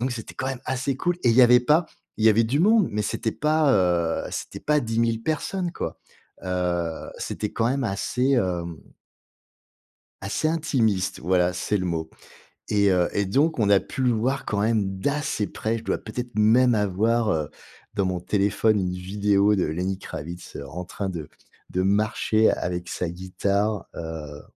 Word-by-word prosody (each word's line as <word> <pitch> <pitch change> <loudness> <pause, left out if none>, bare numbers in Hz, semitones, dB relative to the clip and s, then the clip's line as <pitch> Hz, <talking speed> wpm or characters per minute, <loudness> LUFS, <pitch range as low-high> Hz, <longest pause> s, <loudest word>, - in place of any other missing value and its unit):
donc 130 +2 0
c'était 115 -2 -7
quand 130 - -3
même 130 -2 -4
assez 130 +1 -1
cool 175 +4 0
et 120 - +4
il - - +3
y 130 - +8
avait 125 0 +7
pas 150 +6 +3 0.3
il 110 - 0
y - - +9
avait 110 +1 +4
du 130 +7 +1
monde, 215 +1 +4
mais 105 - -2
c'était 110 +1 -2
pas, 150 -1 +2
heu, 85 -4 +1
c'était - - -6
pas 150 0 +2
10000 115 0 0
personnes, 170 +5 -2
quoi. - - -4 0.5
Heu, 90 -3 -2
c'était 105 - -4
quand 115 +1 +1
même 135 +1 0
assez, 125 +5 0
hem 90 -8 0 1.5
assez 100 +10 -1
intimiste. 120 - 0
Voilà, 90 +1 +2
c'est 95 +3 -1
le 95 - -2
mot. 80 -2 -2 0.6
Et 100 -2 +3
heu, 90 -1 +2
et 100 - +1
donc, 140 - +1
on 105 -3 +2
a 100 -1 +5
pu 130 - -5
le 125 - +3
voir 125 +4 -1
quand 100 - -1
même 105 -3 0
d'assez 145 -3 -1
près. 115 +1 -2
Je 110 - -12
dois - - 0
peut-être 120 +2 -6
même 115 +4 +5
avoir, 110 +3 +1
heu, 75 -2 -2 0.4
dans 100 -2 +1
mon 90 -1 -2
téléphone, 105 +3 +1
une 90 -1 -1
vidéo 100 +2 +2
de 90 - +1
Lenny 90 +5 -2
Kravitz, 85 0 -8
heu, 70 - -6
en 90 +5 -6
train 95 +2 -5
de 85 -5 -5 0.4
de 90 - 0
marcher 110 +2 +2
avec 90 0 -3
sa 90 - -3
guitare, 100 +3 -1
heu, 75 -3 -7
105 Hz, 180 wpm, -24 LUFS, 90-125 Hz, 1.5 s, y